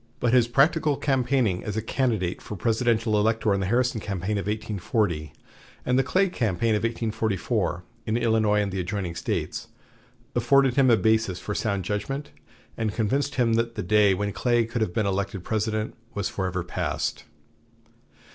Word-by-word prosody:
But 120 0 +1
his 125 -2 +5
practical 145 +3 +3
campaigning 125 -8 +1
as 105 0 -4
a - - +1
candidate 110 -8 -1
for 105 - -7
presidential 115 +1 +1
elector 110 0 +2
in 100 - 0
the 95 - -1
Harrison 120 +1 +1
campaign 100 +1 -2
of 100 - -5
1840, 105 -6 -1 0.5
and 125 +1 +2
the - - +3
Clay 190 +8 +2
campaign 115 - 0
of 105 - +1
1844, 110 -5 -1 0.2
in 110 +1 +1
Illinois 110 -3 +2
and 100 - -3
the 95 - -3
adjoining 90 -1 -3
States, 85 - -3 0.7
afforded 130 +2 +4
him 135 -1 +4
a 115 - +6
basis 110 -5 +2
for 105 - -4
sound 100 -4 -1
judgment, 135 +9 -3 0.4
and 110 -2 -2
convinced 135 +6 0
him 120 -3 +2
that 115 +1 0
the - - -3
day 100 +1 +4
when 100 +1 -2
Clay 120 -2 +2
could 115 +1 -3
have 110 - 0
been 110 +3 0
elected 100 -1 -2
President 110 0 -1 0.2
was 100 -2 -1
forever 90 -2 -2
passed. 90 - -3
110 Hz, 165 wpm, -25 LUFS, 100-120 Hz, 0.7 s, a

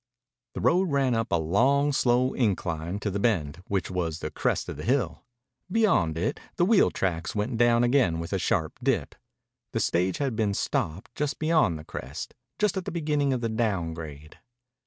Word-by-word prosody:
The - - -3
road 180 +2 +3
ran 135 -3 +2
up 115 0 -1
a - - +4
long, 135 - +2
slow 125 0 +2
incline 90 -6 -1
to 105 - -1
the 100 - -2
Bend, 90 -8 0
which 95 -2 -1
was 85 -3 -2
the - - -5
crest - - -1
of - - -6
the 75 - -6
hill. 115 - 0 0.5
Beyond 180 - +2
it 85 - -1 0.2
the 175 - +3
wheel 210 +1 +5
tracks 85 -2 -2
went 105 +4 -1
down 120 0 +4
again 120 -9 +3
with 85 +3 -5
a 95 - +1
sharp 80 0 -1
dip. 120 - 0 0.6
The - - 0
stage 90 +1 +1
had 135 -5 -1
been 105 -2 0
stopped 90 +6 -2
just 145 +2 -2
beyond 155 - +2
the 75 - -9
crest, 65 +3 -7 0.2
just 210 -2 +1
at 185 - -3
the - - -3
beginning 150 -4 0
of 130 -2 -1
the 115 - -1
down 105 -7 -1
grade. 75 -2 -9
110 Hz, 190 wpm, -27 LUFS, 85-135 Hz, 0.6 s, wheel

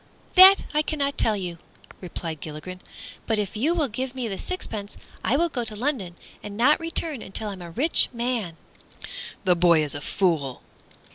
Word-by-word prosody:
"That 380 +1 +9
I 300 - +3
cannot 285 -2 -1
tell 220 - +1
you," 175 -4 -5 0.4
replied 165 -3 -6
Gilligren, 165 +4 -8 0.5
"but 225 - +1
if 205 -1 -2
you 295 +11 +1
will 310 -4 +1
give 255 +3 -4
me 250 -3 -2
the 195 -3 -4
sixpence 215 - -5 0.3
I 265 - +2
will 340 +2 +2
go 255 -7 -3
to 215 -2 -5
London, 215 - -2 0.3
and 205 0 -8
not 265 +6 +4
return 330 -5 -1
until 210 +2 -2
I - - -5
am 190 - -10
a 170 - -8
rich 275 - +3
man." 235 -8 -3 0.9
"The 180 -2 +3
boy 170 -2 +4
is 150 - -3
a 145 - -5
fool!" 155 -8 -1
215 Hz, 185 wpm, -24 LUFS, 180-280 Hz, 0.9 s, That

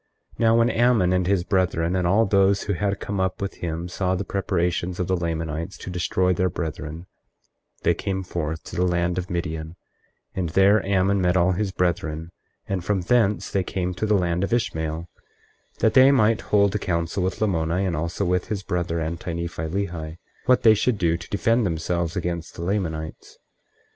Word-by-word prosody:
24:5 - - -29
Now 115 0 +4
when 115 +1 +4
Ammon 115 -6 +3
and 90 -1 +1
his 95 -2 +2
brethren 90 -3 +1
and 90 -1 +1
all 105 +5 +4
those 100 0 +3
who 100 - -1
had 100 +2 -1
come 100 -1 -3
up 95 0 -1
with 100 -1 -4
him 85 0 -4
saw 90 +1 -1
the 95 - -2
preparations 90 -2 -1
of 90 - 0
the 95 - +1
Lamanites 80 0 -3
to 90 - -7
destroy 90 +1 +1
their 90 +1 +1
brethren, 80 0 -5 0.8
they - - +4
came 95 -1 -3
forth 80 -3 -4
to - - -9
the 90 - +1
land 85 0 0
of 90 - -6
Midian, 80 -2 -4 0.6
and 90 -3 -2
there 95 +5 +4
Ammon 95 0 +2
met 90 0 +2
all 90 +1 +3
his 95 +2 -1
brethren; 85 -3 -2 0.4
and 95 -3 -2
from 100 0 0
thence 105 +1 +1
they 95 - +1
came 90 0 -2
to 95 +4 -2
the 105 -1 +4
land 90 0 0
of 100 - -2
Ishmael 80 -8 -1 0.7
that 110 - +3
they 130 +1 +7
might 115 -4 +3
hold 100 -2 +2
a 105 - 0
council 85 +1 -1
with 90 0 -2
Lamoni 90 -2 0
and 90 -3 -1
also 85 +5 -2
with 90 0 0
his 105 -3 -3
brother 85 -2 -2
Anti 85 +2 -4
Nephi 85 -1 -4
Lehi, 85 -3 -4 0.3
what 125 -2 +4
they 110 -2 +8
should 110 +2 +1
do 85 -3 +2
to 85 - -8
defend 115 +4 +2
themselves 85 -1 -1
against 85 -2 -3
the 85 - -6
Lamanites. 80 -5 -3
90 Hz, 195 wpm, -24 LUFS, 85-100 Hz, 0.8 s, they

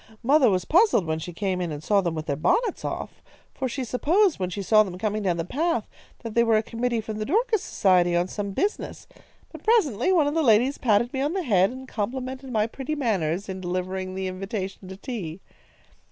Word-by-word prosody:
Mother 270 0 +5
was 185 -2 0
puzzled 360 - +4
when 160 0 -1
she 175 +3 -6
came 185 +1 -2
in 175 -2 -2
and 150 0 -6
saw 205 +1 +3
them 170 -3 -2
with 155 -1 -4
their 145 - -1
bonnets 415 - +1
off, - - -5 0.3
for 260 -2 -3
she 260 +2 -3
supposed, 325 - +2
when 185 -1 -1
she 195 +3 -4
saw 215 +2 +5
them 185 -4 -3
coming 215 +2 -1
down 180 -4 0
the 165 - -2
path, 285 - -1 0.4
that 230 -2 -5
they 235 - +4
were 225 -2 +3
a 215 - +1
committee 230 0 -2
from 215 0 -6
the - - -1
Dorcas 440 - +1
Society, 180 -3 +2
on 175 +1 +1
some 200 +1 -4
business. 395 - -3 0.5
But - - -11
presently 370 - +2
one 335 -5 +4
of 290 - 0
the 325 - +1
ladies 245 +1 +3
patted 235 +1 +2
me 265 - -1
on 290 +4 0
the 380 -1 -1
head, 195 - +3
and 260 +1 -9
complimented 260 +4 -4
my 215 -2 +2
pretty 270 +6 -4
manners 195 - -1
in 190 -1 -5
delivering 185 +1 -3
the 190 0 -3
invitation 190 0 -5
to 190 0 -8
tea. 195 - -6
215 Hz, 220 wpm, -25 LUFS, 185-265 Hz, 0.5 s, Mother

